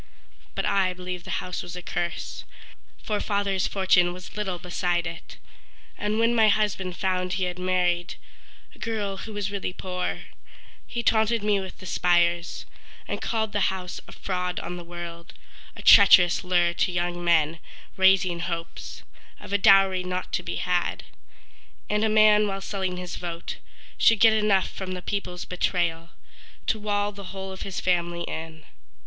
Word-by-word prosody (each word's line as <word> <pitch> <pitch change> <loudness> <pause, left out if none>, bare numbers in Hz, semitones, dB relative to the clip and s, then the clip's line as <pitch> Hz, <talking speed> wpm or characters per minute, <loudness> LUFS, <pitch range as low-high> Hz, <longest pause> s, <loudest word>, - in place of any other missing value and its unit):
But - - -1
I 190 -2 +2
believe 180 -1 -6
the - - -2
house 180 0 -4
was 175 - -8
a 180 - -7
curse, 175 0 -4 0.6
For 210 -1 -1
father's 200 -2 0
fortune 185 -2 +3
was 180 0 -11
little 195 -4 -2
beside 175 0 -1
it; 165 -1 -8 0.6
And 210 +1 -2
when 230 +1 +3
my 220 -2 +5
husband 200 -4 0
found 185 -1 -1
he 190 0 -1
had 180 0 -3
married 180 -1 0 0.6
A - - -19
girl 210 -4 -3
who 220 +2 -8
was 205 -1 -3
really 195 -2 -3
poor, 180 -1 -4 0.7
He 235 - -3
taunted 220 0 +2
me 210 -1 +2
with 190 -1 -7
the 185 - -12
spires, 175 -1 +1 0.4
And - - -4
called 220 -2 -1
the 205 -2 +2
house 185 -1 -5
a - - -11
fraud 180 -1 -3
on 180 - -5
the 175 - -8
world, 170 -1 -8 0.4
A - - -10
treacherous 180 -3 +7
lure 175 -1 +2
to 180 - 0
young 175 0 -2
men, 165 -2 +2 0.4
raising 190 -2 +4
hopes 170 -1 -5 0.4
Of - - -9
a 200 - +3
dowry 195 -1 +5
not 180 0 -4
to - - +1
be - - -4
had; - - -1 0.9
And 210 +1 +1
a 220 - +3
man 215 -1 +5
while 195 -1 -3
selling 190 -2 -3
his 180 -1 -6
vote 170 -1 -5 0.4
Should 225 -2 +5
get 225 0 +7
enough 210 -3 +2
from 185 -1 -5
the 180 -1 -6
people's 180 -3 -4
betrayal 170 -2 -1 0.6
To 220 - 0
wall 205 -1 0
the 200 -1 -10
whole 190 0 -6
of 190 - -9
his 195 -2 -4
family 175 -1 0
in. 160 -1 -7
185 Hz, 165 wpm, -25 LUFS, 175-200 Hz, 0.9 s, treacherous